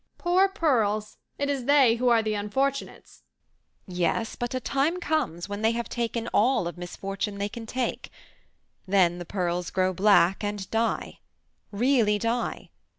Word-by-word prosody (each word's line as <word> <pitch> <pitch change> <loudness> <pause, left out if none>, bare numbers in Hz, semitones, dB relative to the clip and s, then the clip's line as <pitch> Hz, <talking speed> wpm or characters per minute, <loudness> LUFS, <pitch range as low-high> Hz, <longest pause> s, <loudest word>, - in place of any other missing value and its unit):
"Poor 370 +2 +3
pearls! 220 - 0 0.2
It 285 - -1
is 275 -3 -2
they 270 -5 +5
who 250 +1 +2
are 230 -2 +4
the 215 -1 -1
unfortunates." 265 +7 -3 0.6
"Yes, 180 +5 -1
but 240 +1 -4
a - - 0
time 285 +7 0
comes 290 - -1
when 205 +1 -5
they 225 +1 +2
have 235 0 -3
taken 235 -1 -2
all 220 -5 +2
of 175 - -6
misfortune 195 +3 -5
they 200 +1 -2
can 225 +1 -8
take; 255 +1 -3 0.8
then 180 -3 +3
the 175 - -6
pearls 175 -1 -2
grow 185 0 0
black 195 0 +4
and 205 -2 -3
die, 225 0 -1 0.5
really 220 -1 +2
die. 230 +3 -2
225 Hz, 150 wpm, -26 LUFS, 195-255 Hz, 0.8 s, they